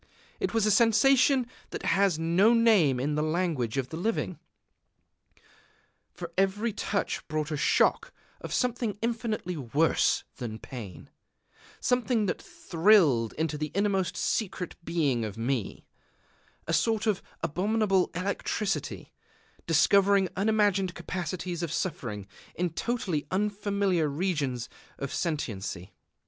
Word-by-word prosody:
It -, -, -1 dB
was 225 Hz, -2 st, +2 dB
a 215 Hz, -, +3 dB
sensation 255 Hz, +4 st, +4 dB, 0.2 s
that -, -, -6 dB
has 190 Hz, -2 st, +2 dB
no 175 Hz, +8 st, +4 dB
name 205 Hz, -, +4 dB
in 145 Hz, +4 st, -1 dB
the 150 Hz, -, 0 dB
language 155 Hz, -7 st, -1 dB
of 130 Hz, -2 st, -1 dB
the 160 Hz, -, -6 dB
living. 160 Hz, -, -2 dB, 1.7 s
For 175 Hz, -1 st, -8 dB
every 205 Hz, +4 st, +1 dB
touch 200 Hz, 0 st, -2 dB
brought 155 Hz, 0 st, -2 dB
a -, -, 0 dB
shock 145 Hz, -, +2 dB, 0.3 s
of -, -, -8 dB
something 240 Hz, -5 st, -1 dB
infinitely 225 Hz, -6 st, -2 dB
worse 145 Hz, +4 st, +2 dB
than 115 Hz, -4 st, -5 dB
pain, 110 Hz, -8 st, -9 dB, 0.7 s
something 245 Hz, -3 st, +1 dB
that 180 Hz, -, -2 dB
thrilled 165 Hz, -, +3 dB
into 160 Hz, -1 st, -2 dB
the 150 Hz, 0 st, -2 dB
innermost 195 Hz, -2 st, 0 dB
secret 185 Hz, -4 st, -2 dB
being 150 Hz, -9 st, 0 dB
of 105 Hz, -1 st, -5 dB
me, 120 Hz, -2 st, -2 dB, 0.8 s
a 165 Hz, -, -2 dB
sort 220 Hz, +7 st, +1 dB
of 210 Hz, -4 st, +1 dB, 0.2 s
abominable 195 Hz, +3 st, +1 dB
electricity, 195 Hz, +2 st, -2 dB, 0.5 s
discovering 195 Hz, +4 st, +4 dB
unimagined 200 Hz, -2 st, +2 dB
capacities 175 Hz, 0 st, -4 dB
of 170 Hz, -3 st, -3 dB
suffering 130 Hz, -, -3 dB, 0.3 s
in 180 Hz, -1 st, -1 dB
totally 180 Hz, -7 st, -2 dB
unfamiliar 200 Hz, -3 st, 0 dB
regions 145 Hz, -6 st, -1 dB, 0.3 s
of 140 Hz, -1 st, -5 dB
sentiency.... 105 Hz, -, -3 dB
180 Hz, 120 wpm, -28 LUFS, 150-210 Hz, 1.7 s, sensation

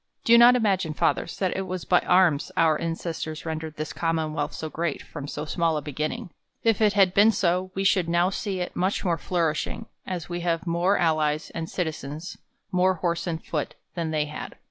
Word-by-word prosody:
Do 230 Hz, -, +7 dB
not 240 Hz, +1 st, +8 dB
imagine, 190 Hz, -9 st, +1 dB
Fathers, 165 Hz, -, 0 dB
that 190 Hz, -2 st, 0 dB
it 190 Hz, 0 st, -3 dB
was 185 Hz, -1 st, -4 dB
by 180 Hz, -, +4 dB
arms 170 Hz, -6 st, +3 dB
our 160 Hz, -2 st, +3 dB
ancestors 165 Hz, -1 st, -4 dB
rendered 160 Hz, -1 st, -4 dB
this 155 Hz, +1 st, -5 dB
Commonwealth 160 Hz, -2 st, -1 dB
so 160 Hz, -, -5 dB
great, 160 Hz, -1 st, -3 dB
from 145 Hz, -2 st, -8 dB
so 150 Hz, +1 st, -5 dB
small 165 Hz, 0 st, 0 dB
a -, -, -2 dB
beginning. 150 Hz, +4 st, -4 dB, 0.3 s
If 225 Hz, -2 st, +2 dB
it 210 Hz, -2 st, +4 dB
had 195 Hz, -3 st, +4 dB
been 205 Hz, +3 st, +6 dB
so, 185 Hz, -2 st, 0 dB
we 195 Hz, -, -1 dB
should 185 Hz, -3 st, +2 dB
now 175 Hz, +2 st, +2 dB
see 195 Hz, -2 st, -3 dB
it 180 Hz, -, -4 dB
much 190 Hz, +3 st, 0 dB
more 170 Hz, -2 st, +1 dB
flourishing, 165 Hz, -4 st, -1 dB, 0.2 s
as 180 Hz, -4 st, -4 dB
we 175 Hz, 0 st, -4 dB
have 170 Hz, 0 st, -1 dB
more 175 Hz, +4 st, +2 dB
al 160 Hz, -2 st, +2 dB
lies 150 Hz, 0 st, -1 dB
and 165 Hz, 0 st, -5 dB
citizens, 160 Hz, -1 st, -4 dB, 0.3 s
more 185 Hz, +1 st, +3 dB
horse 170 Hz, 0 st, -2 dB
and 165 Hz, -2 st, -3 dB
foot, 150 Hz, -3 st, -3 dB, 0.2 s
than 170 Hz, -2 st, -2 dB
they 155 Hz, -1 st, 0 dB
had. 150 Hz, 0 st, -7 dB
170 Hz, 200 wpm, -25 LUFS, 155-185 Hz, 0.3 s, not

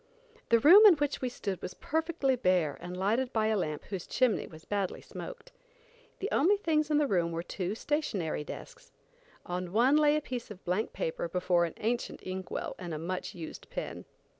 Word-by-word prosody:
The 230 Hz, -, +6 dB
room 345 Hz, -, +9 dB
in 380 Hz, -, +8 dB
which 290 Hz, -1 st, -1 dB
we 255 Hz, -, 0 dB
stood 200 Hz, -6 st, -4 dB
was 185 Hz, -, -6 dB
perfectly 320 Hz, -4 st, 0 dB
bare 180 Hz, -, +2 dB
and 180 Hz, +1 st, -6 dB
lighted 225 Hz, +7 st, +1 dB
by 220 Hz, -2 st, +1 dB
a 220 Hz, -, +2 dB
lamp 155 Hz, -6 st, -2 dB
whose 190 Hz, -3 st, -5 dB
chimney 245 Hz, -1 st, +1 dB
was 160 Hz, -1 st, -13 dB
badly 200 Hz, -3 st, -2 dB
smoked. -, -, -9 dB, 0.7 s
The 405 Hz, -, -3 dB
only 375 Hz, +9 st, +4 dB
things 310 Hz, -5 st, +1 dB
in 300 Hz, -, +3 dB
the 300 Hz, -, +3 dB
room 175 Hz, -8 st, +1 dB
were 165 Hz, 0 st, -3 dB
two 185 Hz, +2 st, -3 dB
stationary 215 Hz, -, -1 dB
desks. -, -, -10 dB, 0.5 s
On 180 Hz, +1 st, -3 dB
the 175 Hz, -, -10 dB
one 250 Hz, +8 st, +4 dB
lay 300 Hz, -1 st, +5 dB
a 305 Hz, -, +1 dB
piece 250 Hz, -5 st, -5 dB
of 205 Hz, -3 st, -11 dB
blank 185 Hz, +5 st, 0 dB
paper 160 Hz, +1 st, -3 dB
before 175 Hz, 0 st, +2 dB
an 165 Hz, -, -6 dB
ancient 235 Hz, +2 st, -2 dB
ink 185 Hz, 0 st, -5 dB
well -, -, -3 dB
and 175 Hz, -3 st, -5 dB
a -, -, -3 dB
much 180 Hz, +4 st, -4 dB
used 165 Hz, -3 st, -8 dB
pen. -, -, -5 dB
215 Hz, 200 wpm, -30 LUFS, 180-290 Hz, 0.7 s, room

